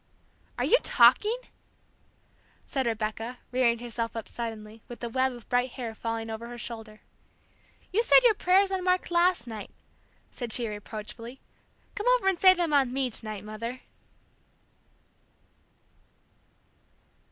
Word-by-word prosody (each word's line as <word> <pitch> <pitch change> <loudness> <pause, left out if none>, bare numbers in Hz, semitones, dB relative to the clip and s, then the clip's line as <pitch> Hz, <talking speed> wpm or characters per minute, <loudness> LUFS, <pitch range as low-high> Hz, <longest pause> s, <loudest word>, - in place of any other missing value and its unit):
"Are - - 0
you - - +5
talking?" 440 +3 +4 1.3
said 265 -3 -2
Rebecca, 225 +2 -3
rearing 245 -2 +2
herself 230 -1 -4
up 225 - -5
suddenly, 220 -2 -7
with 240 0 -10
a 235 - -2
web 260 +2 +1
of 240 -2 -13
bright 245 0 0
hair 235 -4 -5
falling 225 0 -4
over 225 +1 -6
her 240 0 -8
shoulder. 225 -2 -8 0.9
"You 435 - +4
said - - +6
your 475 -3 +6
prayers 385 0 +3
on 380 -1 -2
Mark 365 -1 +1
last 350 -1 +3
night 220 -3 -7 0.3
" - - -37
said 240 -3 -2
she, 240 -2 0
reproachfully, 215 +4 -8 0.5
"come 415 - -4
over 385 - -4
and 380 -3 +2
say 370 -1 +7
them 340 -4 0
on 270 -3 +3
me 260 -1 -1
to - - +2
night, 215 -2 -6
Mother." 230 +4 -6
240 Hz, 140 wpm, -28 LUFS, 225-345 Hz, 1.3 s, say